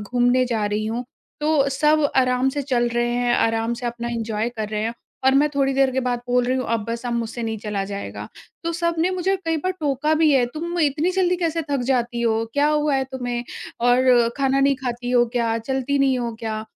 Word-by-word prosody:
घूमने 245 +4 +2
जा 225 -4 -1
रही 210 +1 -1
हूँ 235 +3 -3 0.4
तो 300 -2 +2
सब 300 +2 +2
आराम 255 0 +3
से 285 +1 -2
चल 245 -3 +1
रहे 240 0 0
हैं, 245 0 +1
आराम 225 +1 +1
से 240 +1 -5
अपना 235 0 -4
एंजॉय 225 -1 -2
कर 220 -3 -5
रहे 210 -1 -2
हैं 230 +1 -2 0.3
और 265 0 +5
मैं 295 +2 +4
थोड़ी 275 -1 +2
देर 270 -1 +3
के 265 - 0
बाद 245 -1 -1
बोल 245 0 +2
रही 255 +1 0
हूँ 255 - -2
अब 220 -2 0
बस 230 +1 -4
अब 240 - -2
मुझसे 235 0 -3
नहीं 220 -1 -3
चला 205 -2 -3
जाएगा। 200 0 -6 0.4
तो 335 - -1
सबने 340 +1 0
मुझे 375 +1 0
कई 325 0 0
बार 370 +5 -1
टोका 295 +1 +1
भी 310 -1 +4
है। 260 -3 +4
तुम 340 +2 -4
इतनी 305 +4 +1
जल्दी 360 -1 +1
कैसे 330 -2 -1
थक 275 -2 +1
जाती 240 -1 0
हो? 225 -1 +1
क्या 290 +1 +2
हुआ 300 -1 +1
है 265 0 +1
तुम्हें? 245 -2 -3 0.4
और 245 -1 +4
खाना 275 0 +2
नहीं 275 0 +4
खाती 245 -1 -4
हो 240 -1 +4
क्या? 230 -1 +1
चलती 265 +4 -1
नहीं 265 -2 +2
हो 235 -2 -3
क्या? 220 -1 -3
250 Hz, 225 wpm, -22 LUFS, 235-285 Hz, 0.4 s, और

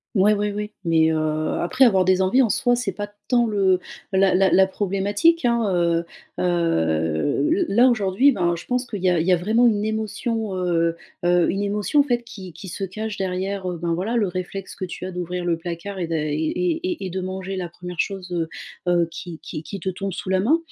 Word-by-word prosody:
Ouais, 205 +2 +5
ouais, 210 0 0
ouais, 210 +1 -4
mais 165 -2 +3
heu, - - 0 0.5
après 255 +9 +4
avoir 190 -5 +4
des 185 0 +3
envies 250 +8 +4
en 230 - +3
soi 245 +2 +2
c'est 240 -5 -2
pas 205 +1 -4 0.2
tant 240 -2 +3
le 195 -4 +2 0.3
la 190 0 +4
la 190 +1 +4
la 190 - +6
problématique, 205 - +1
hein, 235 -3 +2
heu 170 -1 +1 0.3
heu, 80 - +1
l 360 +2 +2
là, 245 +3 +7
aujourd'hui, 225 +4 +3
ben, 175 -6 +1
je 170 - -9
pense 250 0 -1
qu'il 200 -5 -6
y 185 - +4
a 175 -2 +2
il 165 - -1
y 185 - +4
a - - +7
vraiment 220 +7 +3
une 210 -2 +1
émotion, 220 -1 -2
heu 170 -2 +1 0.3
heu, 175 0 +4
une 195 - -2
émotion, 205 +7 +1
en - - +7
fait, 240 -3 0
qui 190 -6 -10
qui 190 +5 -10
se 195 - -5
cache 215 +3 -5
derrière, 190 0 -2
ben, 170 0 -2
voilà, 195 +8 -2
le 220 -4 +2
réflexe 185 +1 -5
que 185 - -4
tu 180 - -7
as 185 - -5
d'ouvrir 180 0 -4
le 170 -1 +1
placard 175 +4 -6
et 170 - -2
d'a 165 - -2
et 150 -1 -1 0.5
et 360 - -2
et - - -3
de 190 - -3
manger 190 +1 -4
la 180 -2 -4
1re 180 0 -9
chose, 190 -2 -2
heu 165 -2 -1 0.4
heu, 170 -1 +3
qui 170 -1 -8
qui 155 - -6
qui 195 +5 -7
te 190 - -2
tombe 195 +1 -4
sous 185 - -6
la 190 - +2
main, 255 - +3
190 Hz, 225 wpm, -23 LUFS, 175-215 Hz, 0.5 s, là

